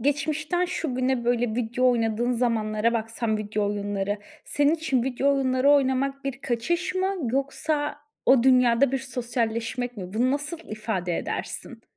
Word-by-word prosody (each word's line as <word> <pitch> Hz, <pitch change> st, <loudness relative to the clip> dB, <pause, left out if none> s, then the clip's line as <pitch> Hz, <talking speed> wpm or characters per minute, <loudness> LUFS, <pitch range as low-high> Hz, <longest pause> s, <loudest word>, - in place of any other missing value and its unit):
Geçmişten 310 Hz, +6 st, 0 dB
şu 335 Hz, -6 st, -3 dB
güne 255 Hz, -1 st, 0 dB
böyle 240 Hz, -2 st, +1 dB
video 245 Hz, +2 st, +2 dB
oynadığın 235 Hz, +1 st, +1 dB
zamanlara 230 Hz, -2 st, +1 dB
baksan, 225 Hz, -1 st, -1 dB
video 210 Hz, 0 st, -1 dB
oyunları, 205 Hz, 0 st, -2 dB, 0.3 s
senin 290 Hz, +2 st, +2 dB
için 280 Hz, -6 st, 0 dB
video 265 Hz, +2 st, +1 dB
oyunları 260 Hz, 0 st, +3 dB
oynamak 275 Hz, 0 st, +2 dB
bir 270 Hz, -2 st, -4 dB
kaçış 275 Hz, +11 st, -1 dB
mı, 380 Hz, +1 st, 0 dB, 0.2 s
yoksa 290 Hz, +2 st, -1 dB, 0.3 s
o 260 Hz, -2 st, +6 dB
dünyada 250 Hz, 0 st, +4 dB
bir 270 Hz, -, +1 dB
sosyalleşmek 240 Hz, -1 st, -2 dB
mi? 185 Hz, -2 st, -7 dB
Bunu 245 Hz, +4 st, +2 dB
nasıl 290 Hz, +4 st, -2 dB
ifade 205 Hz, -5 st, -2 dB
edersin? -, -, -5 dB
250 Hz, 140 wpm, -25 LUFS, 225-275 Hz, 0.3 s, o